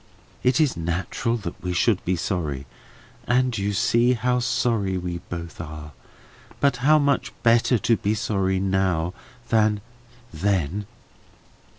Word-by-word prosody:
It 125 Hz, +2 st, +2 dB
is 150 Hz, -4 st, +3 dB
natural 90 Hz, +8 st, -2 dB
that 90 Hz, -6 st, -7 dB
we 90 Hz, -1 st, -2 dB
should 95 Hz, +3 st, +2 dB
be 95 Hz, -, +1 dB
sorry, 75 Hz, -7 st, -2 dB, 0.6 s
and 125 Hz, 0 st, +2 dB
you 100 Hz, -1 st, -1 dB
see 120 Hz, +5 st, +3 dB
how 125 Hz, +1 st, +1 dB
sorry 115 Hz, -5 st, 0 dB
we 90 Hz, -1 st, -4 dB
both 85 Hz, -1 st, -6 dB
are; 75 Hz, -2 st, -8 dB, 0.7 s
but 140 Hz, -3 st, +2 dB
how 150 Hz, +5 st, +5 dB
much 140 Hz, -2 st, +1 dB
better 115 Hz, +1 st, +4 dB
to 115 Hz, +1 st, +2 dB
be 105 Hz, +2 st, 0 dB
sorry 95 Hz, -3 st, 0 dB
now 95 Hz, -3 st, 0 dB, 0.4 s
than 110 Hz, -2 st, +3 dB, 0.5 s
then!" 100 Hz, 0 st, -1 dB
100 Hz, 130 wpm, -24 LUFS, 90-120 Hz, 0.7 s, how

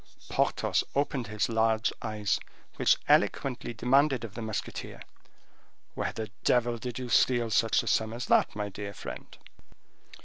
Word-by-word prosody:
Porthos -, -, +1 dB
opened 140 Hz, -3 st, 0 dB
his 110 Hz, 0 st, 0 dB
large 110 Hz, -1 st, +1 dB
eyes, 105 Hz, -2 st, -1 dB, 0.4 s
which -, -, +4 dB
eloquently 125 Hz, -3 st, +2 dB
demanded 130 Hz, +3 st, +2 dB
of 110 Hz, -3 st, -7 dB
the 115 Hz, -, -6 dB
musketeer, 110 Hz, -2 st, -5 dB, 0.9 s
"Where -, -, -2 dB
the 110 Hz, -3 st, -6 dB
devil 120 Hz, -1 st, +2 dB
did 125 Hz, 0 st, -5 dB
you 130 Hz, -1 st, -4 dB
steal 120 Hz, +2 st, +3 dB
such 115 Hz, +1 st, +3 dB
a -, -, -9 dB
sum 110 Hz, 0 st, +1 dB
as 120 Hz, +2 st, -4 dB
that, -, -, +3 dB
my 105 Hz, -1 st, -3 dB
dear 100 Hz, 0 st, -7 dB
friend?" -, -, -8 dB
115 Hz, 145 wpm, -29 LUFS, 110-125 Hz, 0.9 s, which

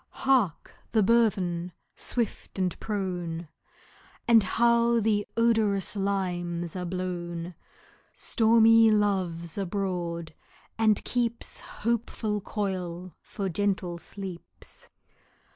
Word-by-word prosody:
Hark! 250 Hz, -, +2 dB, 0.2 s
the 220 Hz, -2 st, +4 dB
burthen, 190 Hz, -6 st, +2 dB, 0.2 s
swift 235 Hz, -4 st, -3 dB
and 185 Hz, -2 st, 0 dB
prone! 180 Hz, -6 st, -3 dB, 0.8 s
And 230 Hz, -1 st, +7 dB
how 235 Hz, +3 st, +3 dB
the 210 Hz, -1 st, +1 dB
odorous 220 Hz, -5 st, +2 dB
limes 175 Hz, -4 st, -2 dB
are 180 Hz, -1 st, -3 dB
blown! 175 Hz, -1 st, -4 dB, 0.6 s
Stormy 225 Hz, 0 st, +5 dB
Love's 190 Hz, -5 st, 0 dB
abroad, 175 Hz, -4 st, -3 dB, 0.4 s
and 215 Hz, -2 st, +2 dB
keeps 235 Hz, -1 st, -1 dB
Hopeful 220 Hz, -2 st, -2 dB
coil 185 Hz, -4 st, -4 dB
for 200 Hz, -2 st, -4 dB
gentle 185 Hz, -1 st, -1 dB
sleeps. 180 Hz, -1 st, -8 dB
195 Hz, 90 wpm, -27 LUFS, 175-220 Hz, 0.8 s, And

